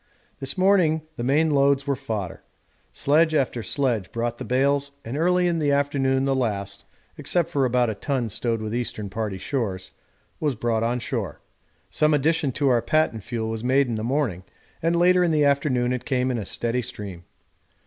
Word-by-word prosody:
This 135 +7 -2
morning 185 -5 +3
the 120 - -4
main 150 +5 +2
loads 140 -1 +3
were 140 -1 0
fodder. 105 -7 -5 0.5
Sledge 155 +3 +2
after 130 -4 0
sledge 120 -6 -1
brought 120 0 -2
the - - -4
bales, 140 +2 +1
and 115 +4 -4
early 180 +3 +2
in 170 -1 0
the 145 -2 +1
afternoon 135 -2 +1
the 135 - +2
last 100 -6 -2 0.3
(except 175 -3 +1
for 140 -2 +2
about 125 -2 +2
a - - -3
ton 130 +2 -2
stowed 115 +1 -2
with 110 0 -4
Eastern 110 -4 -3
Party 105 -2 -3
stores) 95 -5 -3 0.5
was 150 -4 0
brought 115 0 0
on 120 +2 0
shore. 110 - -4 0.5
Some 155 0 +3
addition 150 0 +1
to 140 +1 +1
our 120 -2 +3
patent 120 -4 +1
fuel 115 -1 -3
was 110 0 -4
made 135 +3 +3
in 120 - -3
the 110 -1 -3
morning, 120 - 0 0.4
and 165 +1 +1
later 180 +1 +4
in 175 - +2
the 150 -2 +3
afternoon 135 -3 +2
it 125 -1 -3
came 130 -1 0
in 120 - -1
a 105 - -5
steady 120 +5 -1
stream. 105 -8 -7
130 Hz, 190 wpm, -24 LUFS, 115-145 Hz, 0.5 s, later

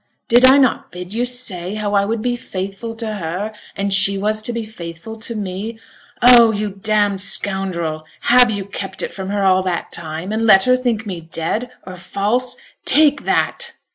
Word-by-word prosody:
Did 240 +2 +6
I 265 +2 +7
not 265 -3 +1
bid 180 +2 -8
you 240 +2 0
say 210 -7 -3
how 210 -1 -3
I 200 -1 +3
would 220 +1 -3
be 245 -1 0
faithful 200 +1 -6
to 225 0 -4
her, 195 +3 -4 0.2
and 200 0 -1
she 195 +1 +5
was 215 +2 -1
to 230 - -1
be 235 -1 -4
faithful 175 0 -9
to 230 +1 -3
me? 205 +2 -5 0.5
Oh! 240 -2 +8
you 210 -1 -3
damned 205 0 0
scoundrel! 180 -6 -2 0.2
have 245 0 +5
you 200 -3 -3
kept 195 -1 -5
it - - -4
from 190 -1 -6
her 200 0 -1
all 190 -1 +4
that 185 -2 -3
time, 165 +3 -5
and 225 +1 0
let 195 -3 +7
her 255 0 +4
think 240 -4 -2
me 185 -5 -5
dead, 165 +9 -3 0.2
or 185 0 -9
false? 210 +8 -1 0.3
Take 295 -2 +3
that!' - - 0
205 Hz, 190 wpm, -18 LUFS, 190-230 Hz, 0.5 s, Oh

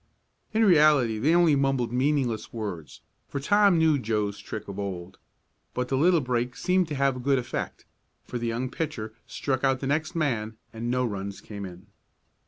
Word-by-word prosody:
In 220 +1 +3
reality 150 - +5
they 155 +9 +3
only 170 -4 +5
mumbled 135 -4 +1
meaningless 130 -3 0
words, 100 -9 -6 0.3
for 140 - -4
Tom 200 +4 +4
knew 160 -3 +4
Joe's 105 -3 -1
trick 110 -1 -7
of 100 0 -6
old. 95 -2 -5 0.6
But 125 0 -2
the 135 - +1
little 165 +4 +4
break 125 -1 -1
seemed 180 -1 +1
to 150 - -4
have 135 -1 +1
a - - -5
good 135 +2 +2
effect, 120 -2 -4 0.4
for 125 - -5
the 120 - -2
young 120 +3 -2
pitcher 110 -9 -4
struck 130 -1 -2
out 135 -1 +2
the 135 - -4
next 155 +5 -1
man 115 -9 -1 0.2
and 115 +1 -4
no 125 +1 +1
runs 100 -3 -4
came 100 -2 -7
in. 90 0 -12
125 Hz, 185 wpm, -27 LUFS, 110-150 Hz, 0.6 s, reality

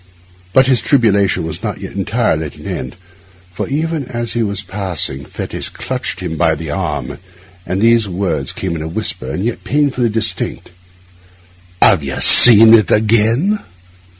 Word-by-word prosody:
But 130 +5 +4
his 130 -4 +1
tribulation 100 - +1
was 80 +2 -7
not 105 -2 -5
yet 95 - -8
entirely 100 -5 -2
at - - -14
an - - -15
end, 65 - -6 0.6
for - - -5
even 155 +1 -3
as 120 -1 -2
he 120 - -2
was 100 -2 -3
passing 90 -8 -4
Fettes - - -7
clutched - - -6
him 80 - -5
by 80 0 +1
the 80 -1 -7
arm - - -5 0.5
and 95 - -3
these 115 -3 +2
words 85 -7 -3
came 90 -3 -5
in 80 - -6
a 80 - -5
whisper, 65 -5 -4
and 90 +9 -4
yet 120 - -4
painfully 140 -5 -1
distinct, 110 -4 -3 1.1
'Have - - +4
you 70 -2 -5
seen 115 -1 +9
it 110 -4 +4
again? 115 - +1
105 Hz, 160 wpm, -15 LUFS, 85-120 Hz, 1.1 s, seen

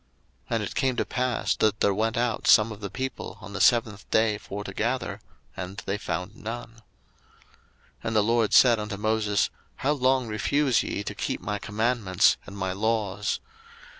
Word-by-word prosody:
02:016:027 - - 0
And 110 - 0
it 100 - -5
came 130 -2 +1
to - - 0
pass, 125 -2 0
that 105 -1 +2
there 100 - +3
went 110 +3 0
out 120 -2 0
some 110 +1 +6
of 105 - -8
the 100 - -4
people 130 +6 -5
on 100 +2 -10
the 100 - -3
seventh 110 -4 +2
day 110 -1 +2
for 105 0 -6
to 100 - -7
gather, 120 +6 -2 0.3
and 95 +1 -6
they 100 +1 -2
found 95 0 -4
none. 115 +2 -6
02:016:028 115 - -20 1.3
And 115 - -1
the 105 - +5
LORD 115 -1 +2
said 120 -3 +7
unto 105 -1 -4
Moses, 105 -1 +1 0.2
How 140 - 0
long 130 -2 +2
refuse 130 +4 +2
ye 100 - -3
to - - -5
keep - - -3
my 105 0 -3
commandments 105 -3 +2
and 100 - -9
my 95 -1 -2
laws? 105 -1 -1
110 Hz, 185 wpm, -26 LUFS, 100-120 Hz, 1.3 s, said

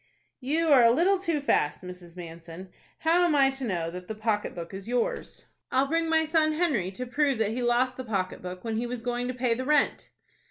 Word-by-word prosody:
"You 310 +5 0
are 275 -4 +7
a 230 - +7
little 360 +10 +3
too 335 -5 -1
fast, 150 - +1
Mrs. 180 -1 -10
Manson. 170 +1 -9 0.3
How 335 +2 +3
am 335 -4 +3
I 270 -1 +5
to 270 0 -4
know 170 -7 -2
that 180 +1 -8
the 220 - -5
pocket 215 -1 -1
book 170 +1 -7
is 195 +1 -8
yours?" 245 0 -2 0.3
"I'll 265 +1 +3
bring 330 +3 0
my 320 0 +3
son 310 -1 +2
Henry 300 - 0
to 250 +6 -5
prove 275 +1 +1
that 220 -1 0
he 245 +3 -3
lost 245 +1 +1
the 260 - -5
pocket 195 -6 -3
book 180 0 -7
when 225 -1 -2
he 240 +2 -2
was 240 -1 -5
going 245 0 -2
to 255 - -2
pay 250 -1 +1
the 250 +3 -3
rent." 295 +1 +1
245 Hz, 230 wpm, -27 LUFS, 190-295 Hz, 0.3 s, are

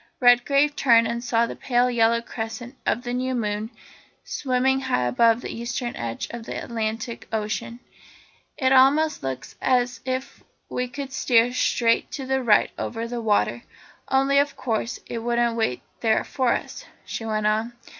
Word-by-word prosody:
Redgrave 275 +4 +4
turned 230 -3 +5
and 235 0 -3
saw 235 -1 +2
the - - -6
pale 245 -1 +1
yellow 230 0 +3
crescent 230 +3 -6
of 240 - +1
the 245 -1 -3
new 255 +1 -1
moon 215 -1 -2 0.5
swimming 265 0 0
high 260 - 0
above 230 - +3
the - - -5
eastern 240 +1 -4
edge 115 -1 -4
of 235 -1 -7
the - - -5
Atlantic 225 +1 -4
Ocean. 220 +2 -3 0.8
"It 260 -2 +2
almost 280 +4 +4
looks 135 0 -5
as 245 -2 +1
if 260 0 -4 0.3
we 250 0 -2
could 270 +2 -7
steer 245 -4 +3
straight 230 -2 +2
to 275 - -4
it 265 0 0
right 235 -5 +3
over 230 0 -3
the 240 0 -4
water 205 - +1 0.5
only, 270 +1 +3
of 285 0 0
course, 230 -1 -2
it 230 - -5
wouldn't 235 0 +1
wait 220 - -1 0.2
there 220 -2 +2
for 255 -3 0
us," - - -3 0.2
she - - -5
went 215 -1 -1
on. 220 +3 +1
240 Hz, 165 wpm, -24 LUFS, 225-260 Hz, 0.8 s, turned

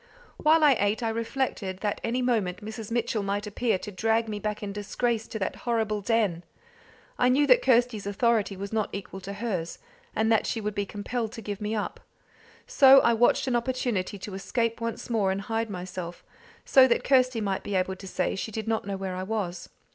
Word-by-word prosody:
While 310 +1 +4
I 290 -2 +7
ate 205 +4 +1
I 225 - +1
reflected 225 -4 -2
that 205 -1 -2
any 250 +2 0
moment 210 -5 0
Mrs. 220 0 -6
Mitchell 230 -2 0
might 200 +1 -2
appear 215 +1 0
to 210 - -8
drag 225 +4 +1
me 210 -1 -4
back 210 +1 -3
in 200 -1 -4
disgrace 225 +2 -2
to - - -5
that 195 - -3
horrible 220 -3 -1
den. 200 -5 +1 0.8
I 250 - +4
knew 280 +3 +4
that - - +6
Kirsty's 240 - +2
authority 205 -1 +1
was 200 +2 -6
not 215 -2 0
equal 195 -1 -6
to 195 +2 -6
hers, 200 -6 -3 0.4
and 220 +1 +2
that 225 - +3
she 230 - -1
would 210 -1 -3
be 200 -1 -2
compelled 220 +2 -3
to 225 - -8
give 205 +1 -5
me 210 +1 -2
up. 210 - -3 0.7
So 275 - +7
I 235 - +4
watched 235 +2 +3
an 255 -2 0
opportunity 235 -5 -1
to 195 +1 -8
escape 230 +4 -2
once 230 -1 -4
more 215 -5 +1
and 195 +1 -2
hide 225 +2 -2
myself, 180 -2 -6 0.4
so 260 -1 +7
that 235 - +1
Kirsty 255 -3 +3
might 195 -3 -1
be 205 - -4
able 190 0 0
to 195 - -10
say 185 0 -1
she 195 - -4
did 220 +1 -5
not 220 -2 -1
know 200 -1 -2
where 190 -1 -4
I 185 - -4
was. 190 -3 -3
215 Hz, 210 wpm, -27 LUFS, 200-235 Hz, 0.8 s, I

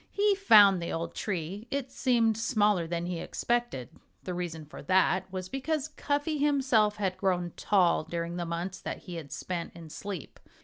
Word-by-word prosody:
He 410 0 +3
found 210 - +7
the 170 - -3
old 165 0 -3
tree. 195 +3 -4
It 275 -2 -3
seemed 235 -4 +2
smaller 210 -6 +2
than 170 0 -2
he 175 -1 -3
expected. 235 - -2 0.3
The 180 - -4
reason 170 -3 -4
for 150 - -10
that 190 0 +2
was 185 -1 -4
because 290 +5 -2
Cuffy 295 0 -1
himself 260 -8 +3
had 190 -3 -2
grown 180 -3 0
tall 180 -6 +3
during 170 +1 -4
the 175 - -2
months 170 +3 -4
that - - -5
he 175 -2 -7
had 150 -4 -8
spent 175 -2 -4
in 165 -2 -10
sleep. 195 -4 -7
190 Hz, 175 wpm, -29 LUFS, 170-240 Hz, 0.3 s, found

